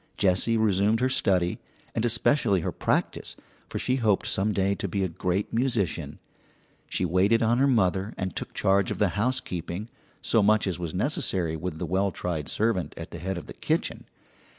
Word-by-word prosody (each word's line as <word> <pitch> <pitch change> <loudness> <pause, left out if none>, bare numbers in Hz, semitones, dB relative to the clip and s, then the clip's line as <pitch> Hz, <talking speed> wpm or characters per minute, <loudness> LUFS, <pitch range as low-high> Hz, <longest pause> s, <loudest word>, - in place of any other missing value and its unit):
Jessie 100 +4 +2
resumed 105 0 +2
her 130 +1 +2
study, 90 -8 +1 0.3
and 115 - -1
especially 115 - +2
her - - -2
practice, - - -1 0.3
for - - -4
she 130 +1 0
hoped 110 -6 +2
some 100 +3 +1
day 100 -1 +1
to 100 - -3
be 100 +2 -1
a - - +1
great 90 +3 -2
musician. 115 - 0 0.7
She 90 - 0
waited 95 +7 +3
on 120 +2 +3
her 140 - +4
mother 100 -4 +1
and 95 -2 -3
took - - -6
charge 95 0 +2
of - - -3
the 105 - +3
housekeeping, 100 -1 -2 0.3
so 115 - +2
much 105 +1 +4
as 95 -3 -2
was 85 -1 -4
necessary 95 - 0
with 80 0 -4
the 90 - -3
well 95 +4 +1
tried 80 -6 -4
servant 105 - 0
at 80 0 -7
the 85 - -7
head 95 +2 -3
of 85 - -7
the - - -9
kitchen. - - -2
100 Hz, 185 wpm, -27 LUFS, 90-110 Hz, 0.7 s, her